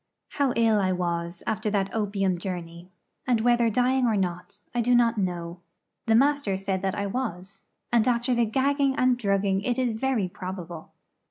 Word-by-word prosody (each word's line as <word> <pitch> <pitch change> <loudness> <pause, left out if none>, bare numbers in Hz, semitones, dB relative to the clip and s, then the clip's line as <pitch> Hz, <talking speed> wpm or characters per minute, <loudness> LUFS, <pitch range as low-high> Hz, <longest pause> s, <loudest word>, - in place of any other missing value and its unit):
How 280 -2 0
ill 225 -2 +3
I 190 -2 +1
was 170 -1 -3
after 215 0 -1
that 200 -2 -1
opium 195 -4 0
journey, 175 -1 -6 0.4
and 245 -3 +3
whether 240 0 +3
dying 250 +3 +2
or 220 -2 +1
not, 180 +2 -4
I 240 - +1
do 245 +1 +3
not 235 -2 +3
know. 175 -2 -3 0.5
The 225 - +4
master 275 -6 +2
said 190 -1 -2
that 190 -1 -1
I 200 - -2
was, 195 -4 -5 0.3
and 235 -1 +4
after 245 +1 +1
the 235 -1 +2
gagging 275 +4 +1
and 255 -2 +3
drugging 195 -4 0
it 245 +3 -1
is 250 -3 0
very 225 -3 0
probable. 180 -3 -8
210 Hz, 175 wpm, -26 LUFS, 185-245 Hz, 0.5 s, The